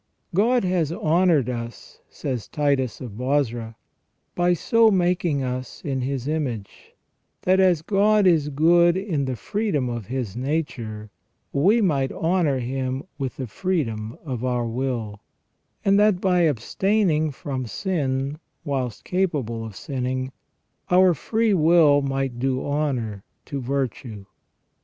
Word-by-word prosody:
" -, -, -49 dB
God 235 Hz, +6 st, +3 dB
has 180 Hz, -4 st, 0 dB
honoured 165 Hz, -4 st, +2 dB
us," 120 Hz, -1 st, -7 dB
says 125 Hz, -6 st, -4 dB
Titus 140 Hz, -5 st, 0 dB
of 125 Hz, -4 st, -6 dB
Bozra, 120 Hz, -4 st, -1 dB, 0.3 s
" -, -, -49 dB
by 175 Hz, 0 st, +4 dB
so 230 Hz, +6 st, +4 dB
making 175 Hz, -6 st, +1 dB
us 125 Hz, 0 st, -4 dB
in 135 Hz, -3 st, -1 dB
His 130 Hz, 0 st, -3 dB
image, 130 Hz, -10 st, -4 dB, 0.5 s
that 185 Hz, +1 st, +3 dB
as 180 Hz, -5 st, +3 dB
God 210 Hz, +2 st, +3 dB
is 160 Hz, -5 st, +3 dB
good 170 Hz, +4 st, +4 dB
in 175 Hz, -8 st, -1 dB
the 130 Hz, -1 st, -2 dB
freedom 150 Hz, -, -1 dB
of 120 Hz, -5 st, -5 dB
His 125 Hz, -6 st, -3 dB
nature, 120 Hz, -6 st, -3 dB, 0.4 s
we 195 Hz, +12 st, +4 dB
might 140 Hz, -9 st, +1 dB
honour 165 Hz, -5 st, +1 dB
Him 130 Hz, +2 st, -3 dB, 0.2 s
with 135 Hz, -3 st, -3 dB
the 130 Hz, -, -3 dB
freedom 115 Hz, -, -2 dB
of 125 Hz, -5 st, -4 dB
our 125 Hz, -2 st, 0 dB
will; 115 Hz, -3 st, -3 dB, 0.7 s
and 200 Hz, 0 st, +4 dB
that 210 Hz, -3 st, +4 dB
by 180 Hz, -3 st, +3 dB
abstaining 155 Hz, -, +1 dB
from 130 Hz, -2 st, -5 dB
sin, 140 Hz, -, -2 dB, 0.3 s
whilst 130 Hz, -6 st, -3 dB
capable 145 Hz, -, -1 dB
of 110 Hz, -3 st, -8 dB
sinning, 130 Hz, +2 st, -3 dB, 0.6 s
our 180 Hz, 0 st, +5 dB
free 220 Hz, -, 0 dB
will 160 Hz, -4 st, +5 dB
might 135 Hz, -3 st, -2 dB
do 130 Hz, 0 st, -1 dB
honour 130 Hz, -9 st, -2 dB, 0.2 s
to 140 Hz, -1 st, -4 dB
virtue." 125 Hz, -5 st, -3 dB
140 Hz, 135 wpm, -23 LUFS, 125-175 Hz, 0.7 s, our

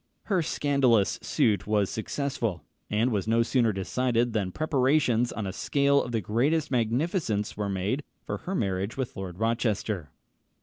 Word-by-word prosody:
Her 190 Hz, -4 st, +1 dB
scandalous 135 Hz, -9 st, +2 dB
suit 105 Hz, -2 st, +1 dB
was 105 Hz, -2 st, +2 dB
successful, 115 Hz, -, -2 dB, 0.3 s
and 110 Hz, +4 st, +1 dB
was 105 Hz, -2 st, -1 dB
no 115 Hz, +1 st, +3 dB
sooner 115 Hz, -1 st, +2 dB
decided 120 Hz, +4 st, 0 dB
than 100 Hz, -4 st, -1 dB
preparations 130 Hz, -, +2 dB
on 110 Hz, -, -4 dB
a 95 Hz, -, -4 dB
scale 140 Hz, +5 st, +2 dB
of 120 Hz, -, -5 dB
the 115 Hz, -2 st, 0 dB
greatest 140 Hz, -, +1 dB
magnificence 120 Hz, -, 0 dB
were 105 Hz, -1 st, -2 dB
made 100 Hz, +9 st, -1 dB, 0.2 s
for -, -, -3 dB
her 190 Hz, -, -5 dB
marriage 100 Hz, -, -1 dB
with 130 Hz, -2 st, -3 dB
Lord 95 Hz, -2 st, -6 dB
Rochester. 110 Hz, -, -1 dB
115 Hz, 150 wpm, -27 LUFS, 105-135 Hz, 0.3 s, no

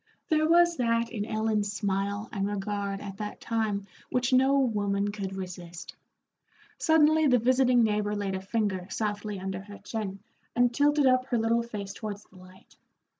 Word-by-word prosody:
There 310 Hz, 0 st, +3 dB
was 345 Hz, 0 st, +5 dB
that 230 Hz, -1 st, +1 dB
in 210 Hz, -4 st, -3 dB
Ellen's 215 Hz, -1 st, 0 dB
smile 200 Hz, 0 st, -2 dB
and 195 Hz, -2 st, -1 dB
regard 200 Hz, -1 st, -3 dB
at 195 Hz, -1 st, -7 dB
that 210 Hz, 0 st, -6 dB
time 220 Hz, -3 st, -1 dB, 0.2 s
which 250 Hz, 0 st, 0 dB
no 265 Hz, +2 st, +5 dB
woman 205 Hz, -5 st, +1 dB
could 195 Hz, -2 st, -5 dB
resist. 180 Hz, -2 st, -8 dB, 0.8 s
Suddenly 315 Hz, -1 st, +4 dB
the 250 Hz, -2 st, +5 dB
visiting 250 Hz, 0 st, +4 dB
neighbor 210 Hz, -1 st, 0 dB
laid 200 Hz, -2 st, -2 dB
a 190 Hz, -, -3 dB
finger 195 Hz, -3 st, -1 dB
softly 210 Hz, -1 st, -3 dB
under 190 Hz, 0 st, -4 dB
her 205 Hz, +1 st, -11 dB
chin 210 Hz, -4 st, -5 dB, 0.4 s
and 245 Hz, 0 st, +3 dB
tilted 290 Hz, +2 st, +3 dB
up 255 Hz, 0 st, +3 dB
her 245 Hz, -, 0 dB
little 230 Hz, +1 st, +2 dB
face 210 Hz, -4 st, -6 dB
towards 210 Hz, -1 st, -6 dB
the 190 Hz, -, -20 dB
light. 185 Hz, +1 st, -17 dB
210 Hz, 165 wpm, -28 LUFS, 200-245 Hz, 0.8 s, was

